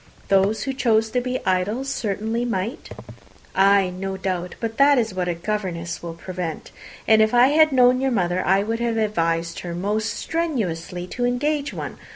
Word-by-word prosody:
Those 195 +2 +2
who 270 - -2
chose 225 -4 +1
to 250 - +1
be 255 +1 -3
idle 190 +7 0
certainly 225 -3 -2
might." 230 - -3 0.6
"Ay, 195 -1 +4
no 190 +1 -5
doubt: 180 -2 -3
but 225 +1 -4
that 280 0 +6
is 225 -4 0
what 185 -1 -2
a 175 - -1
governess 170 -3 -4
will 170 -1 -6
prevent; 175 -2 -6 0.4
and 220 0 +6
if 220 +2 +2
I 245 +2 +6
had 310 +1 +5
known 255 -1 +4
your 270 - +1
mother, 185 -6 0
I 195 +1 +3
should 225 +1 -2
have 235 -1 -1
advised 170 -6 0
her 170 -1 -6
most 210 +5 -1
strenuously 185 - -3
to 245 +7 -5
engage 290 +4 -1
one. - - -7
215 Hz, 180 wpm, -22 LUFS, 180-245 Hz, 0.6 s, that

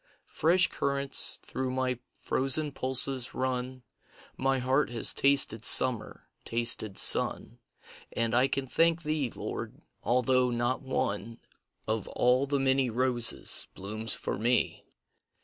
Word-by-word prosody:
Fresh 180 +4 +3
currents 140 0 0
through 130 0 -4
my 130 -1 -2 0.2
frozen 140 +3 -1
pulses 130 -1 0
run; 130 0 -4 0.5
My 135 0 0
heart 130 +2 0
has 120 -2 +1
tasted 135 -6 +1
summer, 120 0 +3 0.2
tasted 115 -3 0
sun, - - +2 0.5
And 115 -1 -1
I 125 +2 +3
can 135 0 -3
thank 165 +5 +1
Thee, 150 -4 -2
Lord, - - -8 0.2
although 125 +1 +1
not 120 +1 -2
one 115 -4 -4 0.5
Of 110 -1 -3
all 125 +3 +1
the 140 0 -1
many 135 -1 +1
roses 120 0 +2
blooms 110 +3 -1
for - - -5
me. 120 +2 0
130 Hz, 120 wpm, -28 LUFS, 120-135 Hz, 0.5 s, Fresh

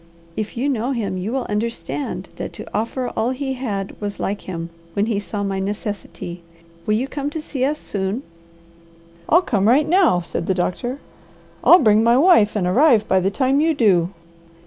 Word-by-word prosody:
"If 215 +1 -4
you 260 +4 0
know 255 -1 0
him, 200 -6 -2
you 195 +5 -3
will 260 -1 -1
understand 230 +6 -3
that - - -5
to - - -8
offer 245 +3 -1
all 225 - -1
he 265 +1 -2
had 210 -7 -4
was 205 -1 -4
like 200 +1 -2
him, 170 -2 -6 0.2
when 200 +3 +1
he 220 -3 0
saw 205 0 -4
my 195 -1 -2
necessity. 195 -3 -5 0.5
You 215 0 +3
will - - -4
come 285 0 -3
to 315 - -5
see 285 -4 -4
us 295 +3 +1
soon?" 200 +5 -3 1.1
"I'll 345 +3 +5
come 205 - +1
right 285 +6 +4
now," 345 - +4
said 170 - -4
the 190 - +1
doctor. 215 +8 -2 0.7
"I'll 350 - +9
bring 215 - +4
my 235 +2 +4
wife 275 - +5
and 200 -4 0
arrive 225 - +4
by 190 - +3
the 185 +1 +1
time 265 +6 +1
you 320 0 +2
do." 185 -9 +3
220 Hz, 190 wpm, -21 LUFS, 195-270 Hz, 1.1 s, I'll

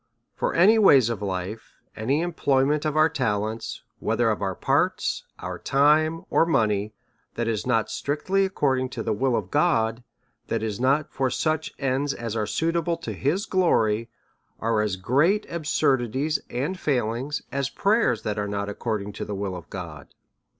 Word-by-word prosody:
^ - - -49 0.3
For - - -1
any 210 +6 +6
ways 135 - +6
of 110 -3 -4
life, 95 +2 -5 0.2
any 130 +8 0
employment 150 -3 +1
of 155 0 0
our 155 +1 +6
talents, 110 -7 -2 0.2
whether - - +1
of - - -3
our - - -1
parts, - - 0
our - - -6
time, 155 +4 +3
or - - +4
money, 110 -9 +1 0.4
that 120 -1 -2
is 115 +1 -2
not 115 -3 +2
strictly 185 +7 0
ac 190 - -5
cording* 130 -2 +1
to 115 - -4
the - - 0
will 125 +3 +1
of 95 -5 -3
God, 115 +1 +2 0.4
that 115 -1 -1
is 110 -1 -3
not 135 +4 +1
for 135 -1 0
such 155 +4 -1
ends 135 +1 0
as 115 -2 -5
are 105 -2 -1
suitable 165 +1 0
to 165 - -6
his 175 +10 0
glory, 115 - +2 0.5
are 110 -1 +1
as 105 -3 0
great 145 - +2
absurdities 140 -2 0
and 150 +10 -3
failing's 130 +1 -1
as 140 0 -1
prayers 200 - +1
that 105 -1 -2
are 105 - -1
not 100 0 -3
according 105 -1 -3
to - - -5
the 105 - -4
will 95 -1 -3
of 90 - -10
God. 85 -7 -8
130 Hz, 170 wpm, -25 LUFS, 110-155 Hz, 0.5 s, any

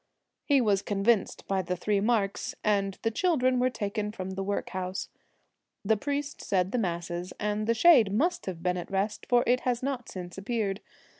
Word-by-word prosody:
He 280 -3 +4
was 205 -4 +2
convinced 205 +1 +1
by 195 -1 +1
the 180 0 -2
three 200 +3 0
marks, 205 -2 0
and 200 -2 +1
the 225 - +1
children 255 -4 +2
were 255 +1 +3
taken 210 -2 -3
from 190 -3 -5
the 190 +1 -4
workhouse. 190 -1 -3 0.8
The 220 +2 +4
priest 285 +6 -3
said 185 -1 0
the 250 - 0
masses, 175 -2 -3
and 210 +1 -1
the 230 - +3
shade 245 - +6
must 340 - 0
have 170 -3 -5
been 180 0 +1
at 175 - -6
rest, 195 +2 -2
for 245 -1 +5
it 250 +1 +3
has 250 -1 -1
not 265 -3 -3
since 180 0 -7
appeared. 200 -1 -2
205 Hz, 180 wpm, -28 LUFS, 190-245 Hz, 0.8 s, shade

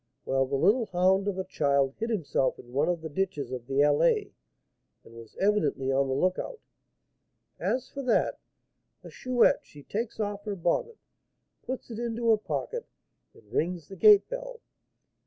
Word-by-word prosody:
Well, 135 0 +1
the 140 - -1
little 205 - +3
hound 190 +2 +2
of 200 -2 -1
a 190 - -1
child 140 -6 +1
hid 225 +1 -2
himself 160 - 0
in 120 0 -14
one 145 +5 +2
of 175 -2 -1
the 160 - -5
ditches 150 -6 -2
of 125 -2 -6
the 135 +1 +2
Allée, 410 - +3 0.7
and - - -16
was 115 -1 -13
evidently 155 -10 +1
on 135 +1 +2
the 130 - -1
lookout. 185 - -1 1.0
As 255 0 -1
for 275 - -7
that, 250 -4 +1 0.6
the - - -11
Chouette, 255 -2 +3
she 145 -1 -15
takes 225 - -4
off 205 -1 -3
her 205 -2 -3
bonnet, 185 - -1 0.6
puts 255 -1 -6
it 225 - -6
into 235 -1 0
her 220 - +5
pocket, 470 - -4 0.5
and - - -20
rings 170 -1 -1
the 195 - -8
gate 415 - +7
bell. - - -6
190 Hz, 170 wpm, -28 LUFS, 140-235 Hz, 1.0 s, gate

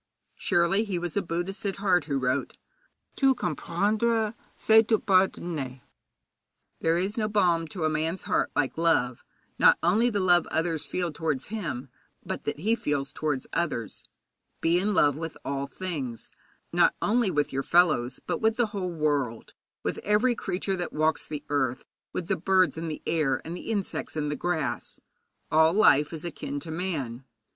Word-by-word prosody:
Surely 175 +5 +2
he 200 -5 -2
was 175 -1 -4
a 200 - +2
Buddhist 175 +3 -4
at 195 -2 -1
heart 185 -5 +2
who 140 -3 -1
wrote: 130 +1 -1 0.6
'Tout 270 -2 +3
comprendre, 210 +7 0 0.2
c'est 220 0 +6
tout 220 -1 +1
pardonner.' 170 - +1 1.0
There 165 +1 +2
is 195 +5 -1
no 215 - +1
balm 175 -6 +2
to 165 +2 -5
a - - +3
man's 160 +4 -2
heart - - +1
like 145 +2 0
love, 130 -8 +2 0.4
not - - +7
only 210 +8 +4
the 205 -4 -1
love 175 -3 +4
others 160 -2 -1
feel 180 -2 -2
towards 150 -3 -2
him, 145 - -4 0.4
but - - -5
that 150 - -3
he 220 +5 +2
feels 145 -10 -1
towards 150 -4 -2
others. 120 - -2 0.6
Be 170 +2 +3
in 205 +2 0
love 145 -5 +4
with 160 +1 -6
all 140 0 -2
things, 140 -7 -5 0.4
not - - +4
only 230 0 +2
with 145 -5 0
your 135 - 0
fellows, 155 -7 +3
but - - -2
with 220 0 +3
the 240 - +2
whole 190 -3 -2
world, 145 -8 -1 0.3
with - - -2
every 215 +5 +2
creature 195 -3 -2
that 175 -1 -4
walks 155 +1 +1
the 150 -1 -5
earth, 130 -3 0 0.3
with 175 - -4
the - - +1
birds 185 +1 +2
in 165 +1 -4
the 155 - -5
air, 150 -5 +1
with 165 - -5
the 180 - -7
insects 205 -7 -3
in 150 -1 -1
the 150 - -1
grass. 160 -6 -2 0.5
All 160 +1 +5
life 150 -8 +5
is 160 0 -6
akin 145 -3 -4
to 160 - -6
man. 150 -8 -3
165 Hz, 170 wpm, -27 LUFS, 145-195 Hz, 1.0 s, not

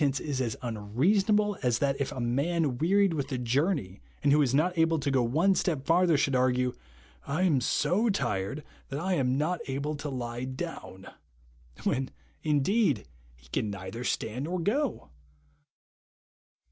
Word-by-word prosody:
tence 140 -2 +2
is 140 -4 -2
as 115 -4 -1
unrcasonaMe 190 - +1
as 120 -3 +2
that 135 +2 +1
if 135 - -1
a - - -6
man 140 +3 0
wearied 195 +2 +3
with 140 -2 -3
a 130 - -1
journey, 125 - 0 0.2
and 140 -1 +4
wdio 150 0 +5
is 130 - +1
not 160 +7 +2
able 165 0 +3
to 140 -1 -1
go 130 -2 +3
one 155 +12 +3
step 155 -7 -1
farther, 170 -1 +4
should 140 -1 +1
argue, 125 0 +2 0.3
' 60 +1 -28
I 155 +6 0
am 150 -8 +3
so 210 - +1
tired 120 - -1 0.3
that 135 - -3
I 185 +3 0
am 130 -5 +1
not 170 +5 0
able 140 +3 -2
to 145 - -5
lie 120 -2 -4
down,' 130 - -7 0.8
when, 135 -1 0 0.3
indeed, 150 - +2 0.3
he - - -21
can 105 - -1
neither 100 +4 -6
stand 125 +2 -2
nor 180 +3 -2
go. 250 - -1
140 Hz, 165 wpm, -29 LUFS, 125-170 Hz, 0.8 s, wdio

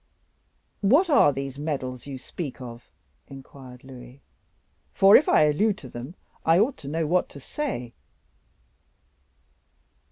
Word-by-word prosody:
"What 290 - +4
are 275 - +6
these 135 0 -6
medals 135 -4 -4
you 135 -2 -6
speak 140 +1 -7
of?" 120 -2 -10 0.4
inquired 130 -2 -13
Louis; 130 0 -13 0.7
"for 195 +1 +6
if 295 - +5
I - - +5
allude 195 +8 +2
to 130 - -11
them, 125 +8 -8 0.3
I 165 +1 +4
ought 235 +8 +2
to 140 - -11
know 160 +3 -1
what 180 +4 +1
to 140 - -11
say." 130 - -5
140 Hz, 130 wpm, -25 LUFS, 130-180 Hz, 0.7 s, are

